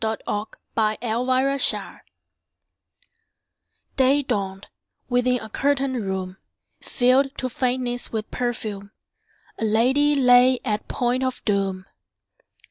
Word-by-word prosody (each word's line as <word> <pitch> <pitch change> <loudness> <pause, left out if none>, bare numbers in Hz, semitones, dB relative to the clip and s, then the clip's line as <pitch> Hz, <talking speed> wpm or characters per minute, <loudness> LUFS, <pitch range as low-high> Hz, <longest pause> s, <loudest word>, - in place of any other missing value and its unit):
Y 220 0 0
Z - - -23
History 215 +1 -2
of 245 +3 -1
a 255 0 +3 0.2
Life - - +1 2.0
DAY 270 +2 +4
dawned: 195 -5 -3 0.4
within 250 0 +2
a 220 - -8
curtained 270 0 0
room, 190 -1 -4 0.4
Filled 265 +3 +2
to 255 - -2
faintness 250 0 -2
with 220 -1 -4
perfume, 215 -5 -4 0.7
A - - -3
lady 260 +7 +3
lay 250 -1 +5
at 215 -3 -2
point 245 +1 -1
of 255 -1 -3
doom. 195 -2 -1
245 Hz, 115 wpm, -23 LUFS, 215-255 Hz, 2.0 s, lay